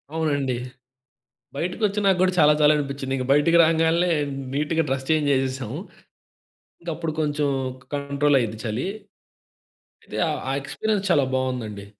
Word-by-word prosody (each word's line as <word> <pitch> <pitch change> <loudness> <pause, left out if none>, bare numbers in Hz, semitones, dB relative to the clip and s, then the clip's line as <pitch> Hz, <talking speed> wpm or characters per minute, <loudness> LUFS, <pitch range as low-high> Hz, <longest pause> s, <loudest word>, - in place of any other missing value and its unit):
అవునండి. 145 -5 0 1.0
బయటకొచ్చినా 200 +5 0
గూడా 185 0 +3
చాలా 150 -1 +6
చలి 150 0 +6
అనిపించింది. 140 -2 -3
ఇంక 130 - -2
బయటికి 165 +4 +4
రాంగాల్నే 165 +2 +2 0.4
నీట్‌గా 155 +3 0
డ్రెస్ 135 0 -2
చేంజ్ 155 -2 +2
చేసేసాము. 130 -1 -2 1.0
ఇంక 170 - -18
అప్పుడు 160 0 -3
కొంచెం 145 -1 0 0.5
కంట్రోల్ 140 0 +1
అయ్యింది 110 -3 -3
చలి. 115 +9 -2 1.2
అయితే - - -8
ఆహ్, 150 -3 -2
ఆ - - 0
ఎక్స్‌పీరియన్స్ 205 +7 -2
చాలా 145 -6 +4
బావుందండి. 120 -6 -3
145 Hz, 125 wpm, -23 LUFS, 135-160 Hz, 1.2 s, చాలా